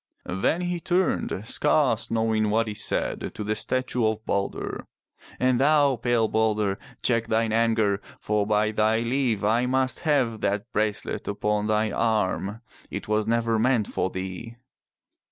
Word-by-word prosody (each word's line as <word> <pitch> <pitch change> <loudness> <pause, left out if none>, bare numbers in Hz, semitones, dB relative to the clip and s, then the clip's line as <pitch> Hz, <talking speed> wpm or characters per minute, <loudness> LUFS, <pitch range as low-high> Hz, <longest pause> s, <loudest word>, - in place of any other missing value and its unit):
Then 95 - 0
he 175 -1 -2
turned, 175 - 0
scarce 140 -5 +2
knowing 110 -1 +1
what 115 +2 +1
he 105 - -3
said, - - -2
to 105 - -4
the 105 +1 -1
statue 125 +2 -1
of 110 0 -2
Balder. 100 0 -3 0.5
"And 130 -1 +2
thou, 145 -1 +4
pale 120 -1 +1
Balder, 105 -3 0 0.2
check 115 -2 +1
thine 110 0 +1
anger, 110 -3 +2 0.2
for 105 -1 0
by 110 0 +2
thy 110 +1 +2
leave, 120 -3 0
I 115 +4 +2
must 130 0 +1
have 130 -8 +1
that 100 +4 -1
bracelet 105 -1 -2
upon 105 +1 -1
thine 110 -1 +1
arm. 110 -1 0 0.3
It - - -6
was 105 0 0
never 115 -1 +1
meant 120 -2 +2
for - - -1
thee." 95 +5 -6
110 Hz, 150 wpm, -25 LUFS, 105-125 Hz, 0.5 s, thou